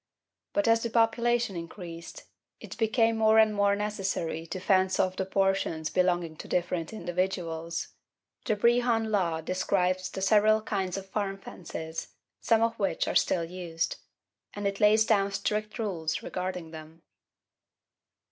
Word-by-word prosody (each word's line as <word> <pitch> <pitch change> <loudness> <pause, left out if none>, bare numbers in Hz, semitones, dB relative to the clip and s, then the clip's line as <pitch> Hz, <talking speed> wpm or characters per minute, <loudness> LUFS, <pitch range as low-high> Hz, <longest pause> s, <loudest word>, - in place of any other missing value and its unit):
But 305 -1 +1
as 230 0 +4
the 235 - -2
population 235 -1 +2
increased 170 0 -8 0.4
it - - -9
became 225 0 +2
more 220 0 +4
and 220 -1 +5
more 200 -1 +3
necessary 195 -6 -2
to 185 - -5
fence 190 0 +2
off 185 0 +2
the 190 - -2
portions 195 -5 0
belonging 175 -3 +1
to - - -9
different 175 -2 -1
individuals. 175 -4 -3 0.5
The 215 - 0
Brehon 235 0 +2
Law 170 -6 +1
describes 185 +1 0
the 190 - -5
several 215 +2 +4
kinds 190 -3 -2
of 195 0 -7
farm 195 -2 -2
fences, 160 -4 -7 0.3
some 225 -1 +3
of 230 0 0
which 195 - 0
are - - -1
still 170 -2 +2
used; 165 -2 -3 0.6
and 205 0 -4
it 200 0 -1
lays 215 +1 +5
down 200 -3 +2
strict 210 +2 -2
rules 170 -8 -2
regarding 180 -3 -4
them. 160 +1 -11
195 Hz, 145 wpm, -28 LUFS, 175-215 Hz, 0.6 s, and